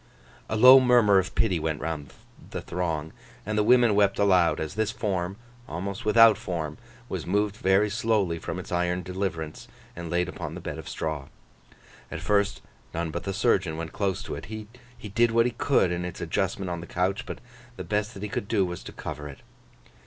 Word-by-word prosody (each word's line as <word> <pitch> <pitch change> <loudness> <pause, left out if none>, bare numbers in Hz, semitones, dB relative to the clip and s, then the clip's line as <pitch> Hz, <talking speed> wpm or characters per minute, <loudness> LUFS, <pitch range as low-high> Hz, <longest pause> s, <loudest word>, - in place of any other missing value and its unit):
A - - -1
low 125 +4 +9
murmur 120 -6 +5
of 95 - -4
pity 95 -7 +2
went 80 -1 -2
round 75 -3 -4 0.4
the - - -5
throng, 80 -3 -3 0.3
and 110 +1 -2
the 105 - +3
women 120 -1 +5
wept 100 -1 +3
aloud, 95 -4 +3
as 80 +1 -3
this 110 0 0
form, 95 -4 -2 0.3
almost 95 +5 -5
without 115 +1 +6
form, 80 -4 -4 0.3
was 90 - -5
moved 105 +2 +1
very 95 +1 +3
slowly 105 -5 0
from 80 - -5
its 90 - -8
iron 90 +1 0
deliverance, 90 -4 -4 0.3
and 85 -1 -6
laid 90 +1 +1
upon - - -6
the - - -6
bed - - -6
of - - -8
straw. 75 -3 -4 0.8
At - - -5
first, 100 -1 +1 0.3
none 85 -1 -2
but 85 +2 -5
the 100 - -1
surgeon 95 -6 +1
went 80 -1 -5
close 100 -2 -1
to - - -6
it. - - -6
He 110 0 -7 0.5
did 120 +2 +4
what 115 +1 +3
he 125 - +1
could 120 -5 +2
in 90 0 -2
its 90 -1 -6
adjustment 95 -2 -1
on 85 -1 -4
the 85 - -9
couch, 95 +7 -1
but - - -5 0.4
the - - -6
best 105 +1 -2
that 100 - -8
he 105 - -3
could 100 - -3
do 100 -4 +2
was 90 -1 -5
to - - -7
cover 75 0 -6
it. 70 - -12
95 Hz, 200 wpm, -26 LUFS, 85-105 Hz, 0.8 s, low